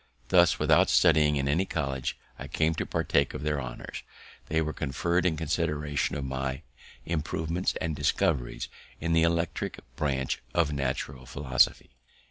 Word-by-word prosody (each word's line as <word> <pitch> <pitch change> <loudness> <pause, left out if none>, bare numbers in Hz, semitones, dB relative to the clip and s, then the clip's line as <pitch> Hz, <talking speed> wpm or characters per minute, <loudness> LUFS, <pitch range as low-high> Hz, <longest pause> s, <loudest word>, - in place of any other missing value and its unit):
Thus, 90 -3 +5
without - - +4
studying 75 -1 +5
in 70 -1 0
any 80 +7 +2
college, 70 -5 -2 0.2
I - - -6
came 80 0 +1
to - - -3
partake 70 -1 +1
of - - -5
their 75 -2 0
honours. 60 -2 -7 0.5
They 80 - +1
were 75 -1 -1
conferr'd 85 +5 0
in 80 -3 0
consideration 75 -2 -1
of 70 -2 -3
my 65 +2 -3 0.4
improvements 80 +2 -1
and 80 -1 -2
discoveries 70 -3 0 0.3
in 85 +1 0
the 80 - +4
electric 85 0 0 0.2
branch 65 -3 -1
of 80 -4 +2
natural 65 -1 -3
philosophy. 65 -2 +1
75 Hz, 145 wpm, -28 LUFS, 70-80 Hz, 0.5 s, Thus